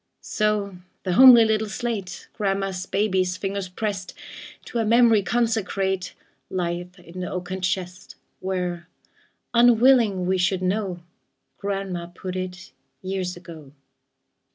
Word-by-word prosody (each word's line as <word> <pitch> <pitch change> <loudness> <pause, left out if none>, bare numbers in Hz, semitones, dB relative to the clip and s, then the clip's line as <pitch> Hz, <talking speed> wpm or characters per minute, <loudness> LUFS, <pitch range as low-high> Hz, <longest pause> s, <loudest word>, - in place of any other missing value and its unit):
So 210 -3 -1 0.3
the 185 - -1
homely 245 +1 +9
little 220 -1 0
slate 205 -4 -4
Grandma's 195 -2 -2
baby's 190 -3 0
fingers 195 -1 -3
pressed, 195 -1 -4 0.5
To 235 - -3
a - - +2
memory 230 -1 +5
consecrate, 195 -3 -1 0.3
Lieth 180 0 -3
in 175 0 -11
the 180 - -4
oaken 185 +1 -4
chest, 180 0 -3 0.2
Where, 180 -2 -3 0.6
unwilling 235 -5 +5
we 185 +1 +1
should 185 +1 +1
know, 185 -2 -1 0.6
Grandma 195 -3 -3
put 180 +1 -7
it, 185 -1 -6 0.3
years 185 -1 -3
ago. 160 -5 -12
190 Hz, 115 wpm, -24 LUFS, 180-210 Hz, 0.6 s, homely